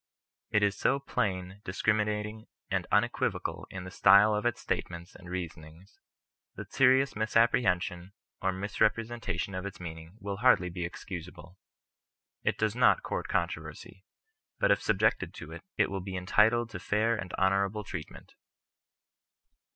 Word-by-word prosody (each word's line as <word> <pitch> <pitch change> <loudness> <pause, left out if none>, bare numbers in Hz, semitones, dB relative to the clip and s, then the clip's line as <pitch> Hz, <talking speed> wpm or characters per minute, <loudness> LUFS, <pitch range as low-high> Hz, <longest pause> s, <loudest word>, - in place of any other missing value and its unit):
It 105 -1 +2
is 100 -1 +2
so 135 - +2
plain, 95 -7 -2
discriminating, 105 +2 -1 0.2
and - - 0
unequivocal - - 0
in 95 -1 -7
the 90 - -8
style 100 +3 +6
of 105 +3 +1
its 120 - -1
statements 85 0 -4
and 90 - -12
reasonings, 85 0 -8 0.6
that - - -9
serious 130 +1 +4
misapprehension 100 -5 +1 0.3
or 95 - +1
misrepre 105 +4 +1
sentation 100 -5 -4
of 95 - -3
its 100 +1 -7
meaning 80 +2 -9
will 100 -2 -4
hardly 110 -6 +4
be 90 0 -3
excusable. 90 0 -8 0.8
It - - 0
does 110 0 0
not 125 - +4
court - - -3
controversy, 85 +1 -4 0.5
but - - +3
if - - +3
subjected - - +1
to - - -8 0.2
it - - +2
will 95 -1 -3
be 95 0 -5
entitled 110 +5 +3
to 90 - -6
fair 105 +5 +1
and 95 -4 -6
honourable 100 +2 +1
treatment. 90 -5 -8
95 Hz, 140 wpm, -30 LUFS, 90-110 Hz, 0.8 s, style